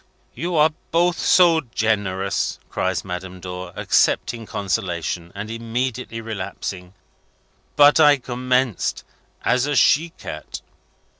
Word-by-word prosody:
"You 175 +1 -3
are 155 0 +5 0.2
both 175 +1 +2
so 170 -3 +5
generous," 100 -3 0
cries 95 0 -1
Madame 90 0 -6
Dor, 90 0 -7
accepting 115 -2 +1
consolation, 90 -4 -3
and 105 +2 -6
immediately 115 +1 -3
relapsing. 95 -3 -6 0.8
"But 145 +2 +6
I 145 -2 +7
commenced 125 -2 -1 0.4
as 125 +3 +2
a 145 - 0
she 150 +7 +4
cat." 75 - -8
115 Hz, 105 wpm, -22 LUFS, 95-140 Hz, 0.8 s, I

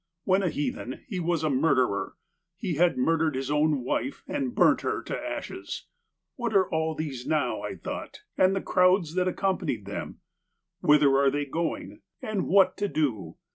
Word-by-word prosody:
When 190 +1 +3
a 185 - +1
heathen 145 -4 -4
he 195 -6 -3
was 170 -2 0
a 155 - +2
murderer: 130 -6 +1 0.4
he 175 - -2
had 170 +3 +3
murdered 160 +2 +2
his 135 +2 -3
own 150 -3 +2
wife 270 - -2
and 275 -4 -2
burnt - - +4
her - - -2
to - - -4
ashes. - - -5 0.5
What 235 -4 -2
are 190 -1 +5
all 160 0 0
these 140 -6 -5
now, 155 -1 0
I - - -5
thought, - - -7
and 185 +1 +4
the 195 - -1
crowds 180 -3 +3
that 180 0 +1
accompany 185 - 0
them? 100 -1 -7 0.6
Whither 150 -4 +5
are 140 0 +4
they 145 +1 -1
going? 165 +4 -4 0.2
And 215 -6 -2
what 190 -1 +4
to 205 - 0
do 110 - -2
160 Hz, 175 wpm, -27 LUFS, 140-185 Hz, 0.6 s, are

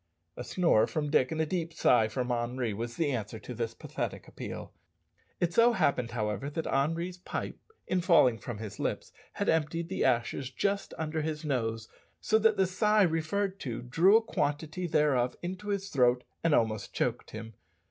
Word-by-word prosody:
A - - -6
snore 170 -12 +3
from 150 -2 -2
Dick 130 -4 +3
and 160 - -2
a 160 - +2
deep 165 0 -2
sigh 120 -7 +4
from 125 +3 -2
Henri 120 -1 -1
was 115 +3 -5
the 155 -3 0
answer 110 -3 -3
to 125 - -8
this 115 -1 -3
pathetic - - -5
appeal. - - -7 0.7
It 175 -1 0
so 235 +3 +5
happened, 125 - +1
however, 110 +2 -2
that 160 +2 -4
Henri's 165 +6 -1
pipe, - - -5 0.3
in 185 - 0
falling 150 - +5
from 120 -4 -6
his 105 -1 -7
lips, - - -2 0.2
had - - -2
emptied 160 +1 0
the 190 - -1
ashes 125 +1 +1
just 200 +5 -2
under 160 0 -2
his 155 0 -3
nose, 115 -5 -1 0.3
so 220 - +2
that 220 -1 +3
the 190 - +4
sigh 210 +3 +3
referred 185 +4 0
to 120 -3 -5
drew 170 - +5
a 225 - 0
quantity 160 -1 -2
thereof 140 -6 +2
into 185 +4 -5
his 200 -1 -2
throat 125 -4 +3 0.2
and 165 -3 +4
almost 110 -4 0
choked - - -1
him. 110 +1 -8
150 Hz, 180 wpm, -30 LUFS, 120-180 Hz, 0.7 s, so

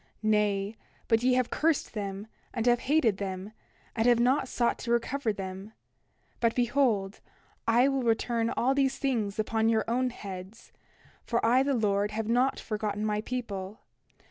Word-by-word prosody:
Nay; 210 -1 +1 0.3
but 225 -1 +3
ye 250 +1 +3
have 255 -2 0
cursed 320 -1 +1
them, 200 -1 -4 0.3
and 230 -1 -1
have 240 -1 +4
hated 280 -10 +3
them, 190 0 -5 0.4
and 225 0 +2
have 240 -1 +5
not 260 +3 +2
sought 240 -2 0
to 235 - -4
recover 235 +1 0
them. 195 +1 -7 0.7
But 230 -1 +1
behold, 240 -6 +1 0.5
I 240 +3 +5
will 270 -1 0
return 230 0 +1
all 255 +3 +1
these 270 -1 +1
things 225 -7 -1
upon 220 +1 +1
your 220 -1 +2
own 250 +2 +1
heads; 195 -2 -9 0.5
for 235 - 0
I 245 +3 +5
the 275 0 +1
Lord 205 -2 +1
have 215 0 -3
not 250 +3 +2
forgotten 210 -1 -3
my 210 0 0
people. 215 -5 -5
225 Hz, 160 wpm, -29 LUFS, 210-250 Hz, 0.7 s, have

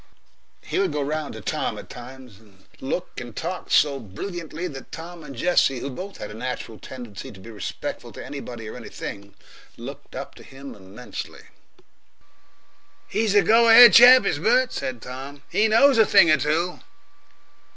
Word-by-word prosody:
He - - -2
would 195 -3 +1
go 150 -1 -2
round 150 -2 -4
to 110 - -8
Tom - - -3
at - - -10
times, 125 -3 -12
and 100 -4 -23
look 175 +7 -4
and 120 -3 -10
talk 180 +3 -5
so 140 -2 +3
brilliantly 165 - -6
that 135 -5 -10
Tom 170 0 -9
and 140 - -10
Jessie, 135 -1 +2
who 135 +3 -5
both 190 +8 -8
had 105 - -7
a - - -9
natural 115 -1 -6
tendency 120 -6 -9
to 95 - -14
be 115 +5 -11
respectful 105 -5 -6
to - - -9
anybody 120 -5 -8
or - - -8
anything, 100 0 -8 0.4
looked - - -10
up - - -7
to - - -15
him 135 +1 -11
immensely. 100 +5 -9 1.6
"He's 215 -2 0
a 205 - +6
go 230 +5 +5
ahead 235 +1 +10
chap, 250 -1 +9
is 145 - 0
Bert," 245 +7 +2
said 125 -4 -5
Tom. 135 +3 -9
"He 220 - +3
knows 230 +3 +5
a 220 - +7
thing 165 - +6
or 155 - +5
two." 155 +6 -1
140 Hz, 170 wpm, -23 LUFS, 120-180 Hz, 1.6 s, ahead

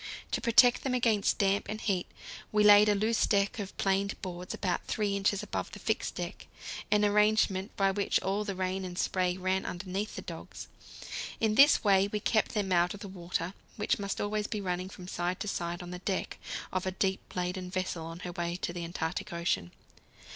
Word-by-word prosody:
To - - 0
protect 240 +1 +6
them 260 -2 0
against 225 -5 +2
damp 200 0 +1
and 215 - -3
heat 190 -5 0 0.4
we 210 0 +3
laid 210 0 +8
a 205 - +4
loose 220 +3 +2
deck 200 +3 +1
of 195 -2 -6
planed 195 +1 0
boards 180 -1 -5
about 185 -3 -1
3 205 -2 0
inches 200 0 +1
above - - -4
the - - -6
fixed - - -1
deck, - - -6 0.4
an 210 0 +4
arrangement 210 -1 +2
by 195 -1 +3
which 200 +1 +1
all 200 +2 0
the 200 -2 -4
rain 185 +1 -2
and 180 -1 -6
spray 180 -1 +1
ran 190 +1 0
underneath 190 +4 -4
the - - -6
dogs. - - -8 0.7
In 220 -1 +2
this 275 +6 +7
way 195 -2 +5
we 210 - -1
kept 215 +2 +1
them 200 -3 0
out 175 +1 +3
of 205 - -12
the 200 - -6
water, 180 -1 -3 0.2
which 210 0 0
must 200 -1 -3
always 210 0 -1
be 215 - -3
running 185 -1 -2
from 180 -1 -10
side 180 0 -2
to - - -3
side 175 -2 -3
on 175 - -8
the 180 - -6
deck 190 0 -3 0.3
of 185 0 -1
a - - 0
deep 190 +1 -2
laden 180 0 -2
vessel 185 -2 -2
on 165 +2 -8
her 180 - -5
way 175 -1 -2
to 175 -1 -3
the 175 -1 -4
Antarctic 175 +4 -3
Ocean. 170 - -1
195 Hz, 205 wpm, -30 LUFS, 180-210 Hz, 0.7 s, laid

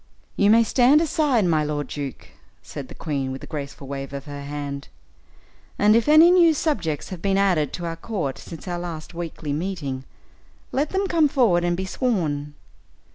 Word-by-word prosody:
"You 200 - +3
may 230 +2 +6
stand 255 +5 +4
aside, 295 - +2
my 160 -3 +2
lord 150 -1 -2
duke," 140 -4 -6 0.3
said - - -8
the - - -12
queen, 140 -4 -3
with 130 - -7
a - - -6
graceful 140 -2 -7
wave 135 0 -6
of 140 0 -6
her 145 -1 -7
hand, 140 -1 -5 0.9
"and 210 +1 +5
if 230 +2 +2
any 315 +3 +8
new 340 -3 +5
subjects 180 - -1
have 185 -3 -7
been 195 -1 +1
added 180 -7 +2
to 175 - -4
our 165 -1 -4
court 165 - -3
since 165 +2 -10
our 175 -1 -3
last 170 -2 -6
weekly 165 -3 -5
meeting, 150 -6 -3 0.7
let 285 +3 0
them 385 +1 0
come 330 -5 +3
forward, 230 -11 +3
and 175 0 0
be 190 - -2
sworn." 155 - -1
175 Hz, 185 wpm, -23 LUFS, 145-230 Hz, 0.9 s, any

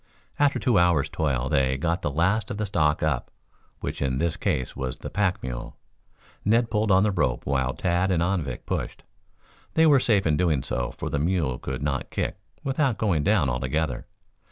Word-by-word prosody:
After 145 -1 +3
two 120 -7 +2
hours' 85 -5 +3
toil 65 -5 -1
they 65 -3 +2
got 85 +4 -1
the - - -1
last 95 +8 +1
of 100 - -4
the 105 - -1
stock 75 -8 +1
up, 75 -6 0 0.5
which - - -4
in 65 -2 0
this 85 +3 0
case 65 - -2
was 65 -1 -4
the - - -7
pack 100 -3 0
mule. - - -6 0.7
Ned 115 +3 +2
pulled 105 -1 +1
on 95 0 +5
the 105 - +2
rope 75 -9 0
while 65 -1 0
Tad 90 +1 +1
and 85 -3 +2
Anvik 85 -9 -2
pushed. - - -4 0.7
They 160 - +5
were 145 -4 +6
safe 105 -6 +2
in 75 -2 +2
doing 80 -6 +1
so, - - -2
for 75 - -6
the 70 - 0
mule 80 -6 0
could 65 +1 -4
not 70 -2 -2
kick - - -3 0.2
without 135 -3 +1
going 90 -9 +1
down 100 -7 +3
altogether. 65 +2 -2
80 Hz, 190 wpm, -25 LUFS, 70-100 Hz, 0.7 s, were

